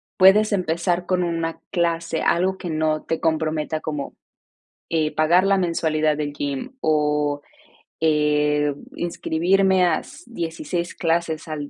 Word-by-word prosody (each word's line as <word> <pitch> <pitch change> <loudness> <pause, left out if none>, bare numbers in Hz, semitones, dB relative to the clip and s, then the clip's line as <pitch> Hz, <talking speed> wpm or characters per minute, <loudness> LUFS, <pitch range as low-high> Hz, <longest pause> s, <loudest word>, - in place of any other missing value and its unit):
Puedes 205 +3 +6
empezar 175 -1 0
con 180 -1 +1
una 165 -1 -2
clase, 170 -1 0
algo 190 +2 +1
que 175 - -5
no 155 -1 0
te 165 - -2
comprometa 155 -1 -1
como, 150 -3 -5 0.8
eh, 155 -2 +1
pagar 165 +4 +4
la 195 0 +3
mensualidad 155 -4 +1
del 145 -1 -3
gym 145 - -4
o 150 -1 +1 0.6
eh, 150 -1 +2 0.2
inscribirme 180 +2 +2
a 165 -3 +2
s 290 +5 -13
16 170 -3 -4
clases 165 -1 -1
a 155 - -4
165 Hz, 130 wpm, -22 LUFS, 155-180 Hz, 0.8 s, Puedes